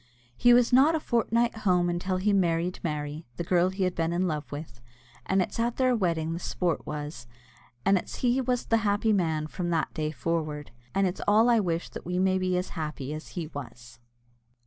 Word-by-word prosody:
He 245 - +5
was 245 0 +5
not 285 +6 +6
a - - +1
fortnight 235 -2 +1
at 220 - -10
home 180 -3 +3
until 175 +2 -1
he 200 +3 +1
married 175 -2 +1
Mary, 150 -1 -4
the - - -2
girl 175 +1 +3
he 190 +1 -2
had 180 -1 +1
been 165 -1 -1
in 180 +2 +1
love 150 -3 -4
with; 145 -5 -8 0.5
and 190 0 +3
it's 180 - -7
at 235 +1 0
their 255 -1 +3
wedding 165 -6 0
the 170 - -4
sport 175 -2 -2
was, 150 -4 -6 0.6
and 195 -1 +4
it's - - -8
he 250 +1 +1
was 250 -1 -1
the 225 - +3
happy 215 0 +1
man 160 -5 0
from 175 +3 -4
that 165 -2 0
day 155 -1 -2
forward, 155 0 -3 0.2
and 195 0 +3
it's 180 0 -2
all 220 +4 +5
I 230 - +5
wish 170 -4 -1
that - - -8
we 180 0 -1
may 190 0 +2
be 185 -1 0
as 180 - -2
happy 150 -4 -5
as 155 +1 -7
he 170 - -2
was. 120 -5 -10
180 Hz, 215 wpm, -27 LUFS, 155-205 Hz, 0.6 s, not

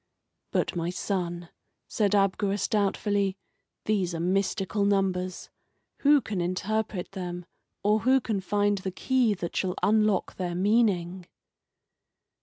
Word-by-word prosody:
"But, - - -1
my 170 0 -1
son," 175 -2 -3 0.4
said 205 -2 +1
Abgarus, 200 0 +1
doubtfully, 200 -1 0 0.5
"these 190 -5 0
are - - -3
mystical 195 +3 0
numbers. 190 -2 0 0.5
Who 290 0 +5
can 200 -7 -3
interpret 185 +2 -2
them, 180 -2 -5 0.4
or 210 +2 +3
who 260 +4 +4
can 215 -6 -2
find 205 +1 +1
the 190 - -3
key 240 +3 +1
that 170 -2 -5
shall 185 -1 0
unlock 215 -2 +2
their 175 -2 -3
meaning?" 185 -3 +1
195 Hz, 120 wpm, -27 LUFS, 180-210 Hz, 0.5 s, Who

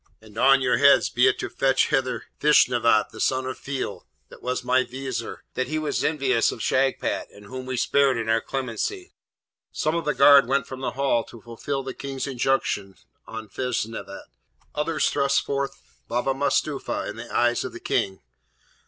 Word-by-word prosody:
and 110 -1 -17
on 135 +3 +5
your 125 -2 +2
heads 140 +2 +5
be 125 +2 +3
it 130 - +2
to - - -3
fetch 135 -1 +1
hither 135 -3 -1
Feshnavat, 120 -7 +4
the 110 - -11
son 130 +2 +1
of 130 - -4
Feil, 135 - -5 0.2
that - - -14
was 125 0 -2
my 130 +1 +3
Vizier, 125 -2 -6
he - - -2
that 155 +4 -3
was 155 -1 -2
envious 135 -6 +2
of - - -8
Shagpat, 135 +4 0
and 100 0 -15
whom 130 +3 -7
we 130 -1 -3
spared 135 0 +3
in 115 -1 -3
our 115 0 +2
clemency.' 135 - -4 0.6
Some 155 - -1
of 170 -2 -2
the 150 - 0
guard 140 -2 +7
went 135 -1 +1
from 130 - -8
the - - -2
Hall 135 -3 +1
to 115 - -13
fulfil 135 +4 -4
the 130 0 -5
King's 135 -1 -5
injunction 125 -7 -1 0.3
on 110 -1 -7
Feshnavat, 110 -4 -4 0.5
others 155 +1 0
thrust 140 -1 +2
forth 140 0 -3 0.3
Baba 125 +3 0
Mustapha 140 +1 -1
in 105 - -6
the 115 +1 -9
eyes 120 0 +2
of - - -5
the - - -9
King. 95 -1 -1
130 Hz, 180 wpm, -24 LUFS, 115-140 Hz, 0.6 s, guard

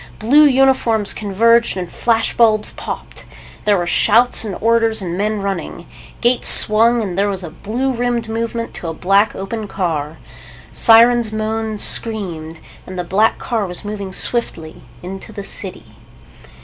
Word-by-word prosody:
Blue 285 +8 +4
uniforms 260 -6 +2
converged 230 +2 +1
and 180 -2 -6
flash 230 -1 -1
bulbs 220 -2 +2
popped. - - -8 0.4
There 205 -1 +3
were 175 - -2
shouts 225 +8 +3
and 210 -4 -5
orders 225 0 +1
and 175 -3 -5
men 210 +1 -2
running. 175 -3 -5 0.4
Gates 245 +1 +2
swung 230 +2 +5
and 185 -4 -5
there 200 +2 0
was 190 -2 -5
a 165 - -8
blue 240 +10 -3
rimmed 240 -2 -2
movement 230 +1 -4
to 170 - -8
a 165 - -5
black 200 +5 +1
open 210 +3 -6
car. 160 -6 -4 0.5
Sirens 235 0 +4
moaned, 220 0 -3
screamed. 170 -8 0 0.3
And 185 - -8
the 180 - -3
black 205 +6 +1
car 225 -5 -3
was 180 +3 -7
moving 200 -2 -6
swiftly 180 -7 -3 0.2
into 190 +4 -8
the 200 -2 -8
city. 195 -1 -6
215 Hz, 150 wpm, -17 LUFS, 190-230 Hz, 0.5 s, swung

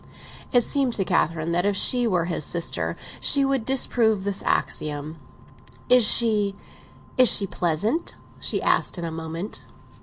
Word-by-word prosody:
It 245 -1 +3
seemed 270 -2 0
to 195 - +3
Catherine 165 -2 -1
that 175 +1 0
if 200 0 0
she 245 +3 +3
were 180 -5 0
his 165 -3 -3
sister 170 +2 -2 0.2
she 280 -1 +3
would 270 -4 -1
disprove 230 -6 +1
this 200 -1 -3
axiom. 150 +1 -3 0.7
"Is 250 -3 +6
she—is 215 +3 +1
she 200 - +4
pleasant?" 195 - -2 0.2
she - - -1
asked - - +1
in 170 - -5
a 165 - -5
moment. 165 +4 -7
200 Hz, 145 wpm, -23 LUFS, 170-240 Hz, 0.7 s, Is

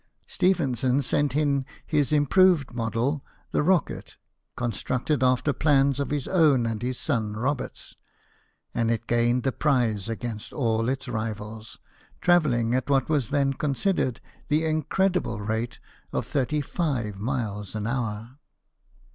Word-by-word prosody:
Stephenson 135 -8 +1
sent 140 +1 +1
in 140 -2 +2 0.2
his 150 -2 +1
improved 150 -1 +4
model, 120 +5 -1 0.3
the - - +2
Rocket, 175 +2 0 0.4
constructed 120 +4 -1
after 130 +2 +3
plans 140 -2 +3
of 140 - -1
his 145 -2 -2
own 150 -9 +4
and 115 -1 -2
his 125 +1 -2
son 110 -3 -1
Robert's, 135 +4 -3 0.8
and 115 -1 +1
it 115 -1 -1
gained 120 +1 +2
the 135 - +1
prize 120 -8 +1
against 115 -1 -5
all 115 -3 +1
its 135 +1 -3
rivals, 110 -1 -5 0.4
travelling 135 -10 +3
at 130 +2 0
what 135 -1 +2
was 145 -7 +1
then 140 -1 +2
considered 140 - 0 0.3
the 155 +2 +2
in 155 0 +1
credible 180 - 0
rate 110 +3 -3 0.3
of - - -2
35 135 - -1
miles 105 -4 -3
an 105 -1 -2
hour. 115 +1 -3
130 Hz, 130 wpm, -26 LUFS, 115-145 Hz, 0.8 s, improved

